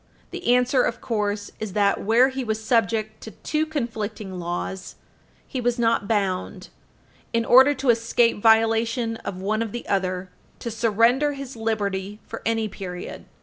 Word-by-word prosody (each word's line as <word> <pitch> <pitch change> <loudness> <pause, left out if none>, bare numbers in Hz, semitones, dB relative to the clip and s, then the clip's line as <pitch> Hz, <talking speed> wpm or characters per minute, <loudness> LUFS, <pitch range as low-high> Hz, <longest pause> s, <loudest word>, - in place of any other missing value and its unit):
The 245 - +2
answer, 250 +1 +3
of 240 - -1
course, 210 -3 -2
is 215 -3 -5
that, 200 -1 +2
where 235 +5 +4
he 265 0 -4
was 220 -2 -2
subject 220 -1 0
to - - -8 0.2
two 310 0 0
conflicting 220 -9 -4
laws, 175 +2 -4 0.5
he 255 - -4
was 245 0 0
not 230 -3 +1
bound, 195 -4 -1 0.6
in 230 0 +1
order 265 +5 +7
to 260 -2 +3
escape 230 -1 +1
violation 225 +1 +3
of 185 - -6
one 215 +3 -1
or 230 - -1
the 240 +3 -7
other, 185 -1 -1 0.3
to 235 - -5
surrender 230 +6 +2
his 275 -2 -7
liberty 205 -3 -2
for 230 - -7
any 225 -1 +1
period. 180 -3 -7
225 Hz, 155 wpm, -24 LUFS, 205-240 Hz, 0.6 s, order